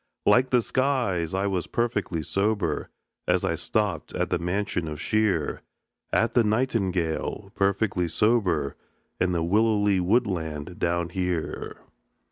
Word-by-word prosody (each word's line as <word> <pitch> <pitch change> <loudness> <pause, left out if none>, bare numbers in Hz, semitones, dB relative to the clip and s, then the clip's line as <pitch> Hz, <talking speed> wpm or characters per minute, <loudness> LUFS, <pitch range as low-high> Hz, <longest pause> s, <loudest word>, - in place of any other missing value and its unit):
Like 130 +1 +5
the 125 -2 +3
skies, 120 - 0
I 95 +1 0
was 95 -3 -1
perfectly 105 -9 -1
sober, 100 +1 0 0.4
As - - +2
I - - +1
stopped - - -1
at - - -1
the - - +1
mansion 90 -1 -1
of 75 -1 -5
Shear, 105 -8 0 0.5
At 115 - +2
the 120 - +4
Nightingale, 100 -5 -1
perfectly 100 -3 +1
sober, 90 - +1 0.4
And 90 -1 +1
the 85 - +1
willowy 105 +1 +3
woodland 90 -6 -1
down 85 0 0
here. 90 -2 -3
95 Hz, 125 wpm, -26 LUFS, 85-110 Hz, 0.5 s, Like